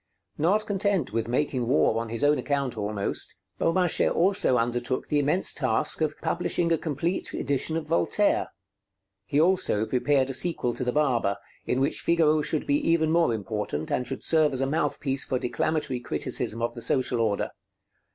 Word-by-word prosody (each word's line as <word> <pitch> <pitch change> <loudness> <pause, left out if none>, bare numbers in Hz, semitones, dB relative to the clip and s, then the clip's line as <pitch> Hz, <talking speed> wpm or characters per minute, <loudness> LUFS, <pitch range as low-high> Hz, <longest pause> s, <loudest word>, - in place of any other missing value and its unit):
Not 200 +8 +2
content 195 - -1
with 115 0 -1
making 125 -1 -1
war 115 -4 +2
on 115 - -6
his 115 +2 -1
own 145 +1 +4
account 140 -4 -1
almost, 105 -1 -2 0.2
Beaumarchais 175 +1 +2
also 185 -8 +2
undertook 120 +2 -1
the 150 - +1
immense 150 +6 +2
task - - 0
of - - -1
publishing 170 -1 0
a 165 - +3
complete 165 +4 -2
edition 145 +3 -1
of 165 - -4
Voltaire. 85 - +1 0.8
He 145 - +1
also 165 - +2
prepared 135 +2 +1
a - - -4
sequel 145 -6 +1
to 125 - -4
the 125 - 0
'Barber,' 120 -9 +1 0.3
in 125 - 0
which 135 - +1
Figaro 155 -2 +3
should 155 0 -2
be 145 - +2
even 160 -1 +2
more 170 -5 +3
important, 105 -7 -3
and 125 - -1
should 135 - -5
serve 155 -3 +3
as 130 - -1
a - - +2
mouthpiece 140 -2 -1
for 130 - -1
declamatory 135 +2 -1
criticism 115 -1 -1
of 120 - -1
the 120 - -9
social 125 0 0
order. 105 -3 0
140 Hz, 170 wpm, -26 LUFS, 120-160 Hz, 0.8 s, own